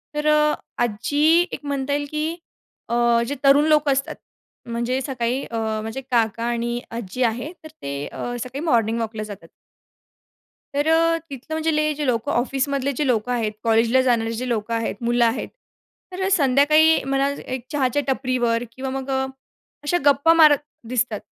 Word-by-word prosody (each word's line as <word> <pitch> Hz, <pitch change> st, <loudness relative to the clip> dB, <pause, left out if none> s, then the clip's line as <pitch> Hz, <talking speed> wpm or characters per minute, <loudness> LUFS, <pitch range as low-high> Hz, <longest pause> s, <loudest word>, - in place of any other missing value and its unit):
तर 300 Hz, 0 st, -1 dB
अ, 300 Hz, 0 st, +4 dB, 0.3 s
आज 240 Hz, -, +2 dB, 0.2 s
जी 315 Hz, +4 st, +4 dB
एक -, -, -5 dB
म्हणता 280 Hz, 0 st, -2 dB
येईल 290 Hz, 0 st, -1 dB
की 305 Hz, 0 st, -1 dB, 0.6 s
अ, 235 Hz, -, 0 dB, 0.3 s
जे 285 Hz, -, -3 dB
तरुण 280 Hz, +2 st, +6 dB
लोकं 300 Hz, -2 st, +3 dB
असतात, 275 Hz, +4 st, -1 dB, 0.5 s
म्हणजे 235 Hz, +3 st, -1 dB
सकाळी 255 Hz, -1 st, -2 dB
अ, 230 Hz, -, -5 dB, 0.3 s
माझे 225 Hz, +4 st, -5 dB
काका 230 Hz, -3 st, 0 dB
आणि 240 Hz, 0 st, -1 dB
आजी 235 Hz, +2 st, -3 dB
आहे 245 Hz, +7 st, -1 dB
तर 315 Hz, -, -8 dB
ते 140 Hz, 0 st, -4 dB
अ, 245 Hz, -, -5 dB
सकाळी 265 Hz, +4 st, -6 dB
मॉर्निंग 230 Hz, -5 st, +2 dB
वॉकला 220 Hz, -1 st, -4 dB
जातात. 205 Hz, -2 st, -9 dB, 1.3 s
तर 290 Hz, +2 st, +1 dB
अ, 330 Hz, +1 st, +3 dB
तिथलं 275 Hz, +3 st, -8 dB
म्हणजे 305 Hz, -1 st, +1 dB
जे 295 Hz, -, -3 dB
लोकं 250 Hz, +2 st, 0 dB
ऑफिसमधले 270 Hz, +2 st, 0 dB
जे 300 Hz, -, 0 dB
लोकं 245 Hz, 0 st, 0 dB
आहेत, 225 Hz, -3 st, 0 dB
कॉलेजला 230 Hz, +3 st, +3 dB
जाणारे 230 Hz, -3 st, +1 dB
जे 250 Hz, +3 st, -4 dB
लोकं 230 Hz, -1 st, -2 dB
आहेत 225 Hz, -3 st, -1 dB
मुलं 240 Hz, 0 st, +3 dB
आहेत. 230 Hz, +2 st, -1 dB, 0.6 s
तर 375 Hz, +1 st, -2 dB
संध्याकाळी 305 Hz, +1 st, +4 dB
मला 275 Hz, +1 st, +1 dB, 0.2 s
एक 255 Hz, -1 st, -5 dB
चहाच्या 285 Hz, -1 st, +1 dB
टपरीवर 250 Hz, -3 st, 0 dB
किंवा 265 Hz, +2 st, -5 dB
मग 270 Hz, 0 st, -5 dB, 0.7 s
अशा 325 Hz, +4 st, +1 dB
गप्पा 285 Hz, +3 st, +5 dB
मारत 310 Hz, -3 st, +7 dB, 0.3 s
दिसतात. 240 Hz, -3 st, -1 dB
260 Hz, 160 wpm, -22 LUFS, 235-290 Hz, 1.3 s, मारत